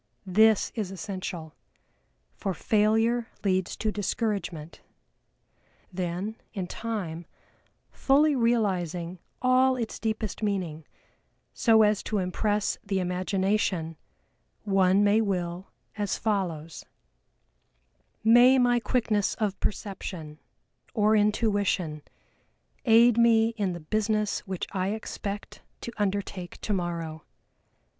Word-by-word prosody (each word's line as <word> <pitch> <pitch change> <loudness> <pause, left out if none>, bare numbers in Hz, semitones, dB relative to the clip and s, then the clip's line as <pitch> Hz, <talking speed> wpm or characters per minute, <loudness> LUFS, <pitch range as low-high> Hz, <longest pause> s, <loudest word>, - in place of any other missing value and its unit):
This 215 +3 +4
is 210 -5 -3
essential, 185 -4 -6 0.8
for 190 -2 -3
failure 225 +2 +2 0.2
leads 185 -2 0
to 215 - -1
discouragement. 200 -6 -3 1.1
Then, 185 +4 -3 0.2
in 190 -3 -2
time, 180 -6 -5 0.6
fully 290 +2 +3
realizing 185 -8 0 0.2
all 255 +1 +4
its 230 -3 -4
deepest 220 -2 -3
meaning, 180 -7 -2 0.7
so 220 -2 +5
as 210 -1 +2
to 215 - -2
impress 205 +3 0
the 200 -2 -1
Imagination 185 -2 0 0.7
one 195 -1 +3
may 205 +2 +4
will 180 -3 -2 0.3
as 205 -2 -1
follows: 170 -8 -2 1.4
"May 240 +4 +7
my 245 -1 +3
quickness 220 -3 0
of 205 -3 -2
Perception, 180 -7 -5 0.6
or 215 -1 +4
Intuition, 205 -7 +1 0.8
aid 235 0 +6
me 225 -1 +5
in 205 -5 -2
the 175 - -6
business 215 +5 0
which 185 -2 -3
I 190 -1 -1
expect 205 -2 -6 0.2
to 235 - -6
undertake 195 -3 -3
tomorrow. 170 -5 -3
205 Hz, 100 wpm, -27 LUFS, 180-220 Hz, 1.4 s, May